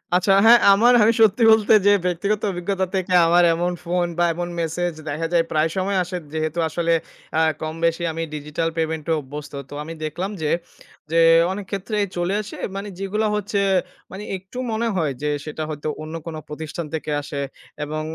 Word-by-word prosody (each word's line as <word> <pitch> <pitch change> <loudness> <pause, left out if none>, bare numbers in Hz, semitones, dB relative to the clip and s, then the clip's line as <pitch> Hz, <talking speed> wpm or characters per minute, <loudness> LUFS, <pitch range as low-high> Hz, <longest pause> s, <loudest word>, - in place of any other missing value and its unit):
আচ্ছা, 185 +2 +3
হ্যাঁ, 235 +1 +8
আমার 235 +5 +5
আমি 225 +2 +5
সত্যি 220 +1 +4
বলতে 220 -1 +5
যে 205 - +7
ব্যক্তিগত 200 +4 0
অভিজ্ঞতা 190 +1 -1
থেকে 185 -1 -1
আমার 175 +1 +5
এমন 175 +2 0
ফোন 175 0 0
বা 175 - +3
এমন 175 +1 -4
মেসেজ 170 +1 -1 0.2
দেখা 160 +3 -2
যায় 170 -1 +4
প্রায় 155 +1 +2
সময় 190 +1 0
আসে 180 +1 -5 0.2
যেহেতু 155 +1 -2
আসলে 170 +1 0 0.4
অ্যা 160 - +2 0.2
কমবেশি 165 +2 -1
আমি 165 - -4
ডিজিটাল 150 +2 -2
পেমেন্ট 160 -1 -2
এ - - +4
অভ্যস্ত। 145 +2 -9 0.2
তো - - -10
আমি 165 +2 -7
দেখলাম 175 +6 -3
যে, 150 - 0 0.6
যে 165 - +4 0.3
অনেক 200 +1 -5
ক্ষেত্রেই 205 +1 -1
চলে 175 +2 0
আসে 210 - -9 0.2
মানে 200 +1 -5
যেগুলো 205 +3 -1
হচ্ছে 205 0 -1 0.5
মানে 195 +2 -7
একটু 190 +6 -13
মনে 225 +1 0
হয় 155 -6 0
যে, 150 - 0 0.2
সেটা 155 0 -5
হয়তো 150 0 -5 0.2
অন্য 155 +1 -7
কোনো 160 -1 -5
প্রতিষ্ঠান 160 +2 -5
থেকে 155 -1 -3
আসে 140 0 -5 0.4
এবং 155 +1 -3
175 Hz, 180 wpm, -22 LUFS, 155-195 Hz, 0.6 s, হ্যাঁ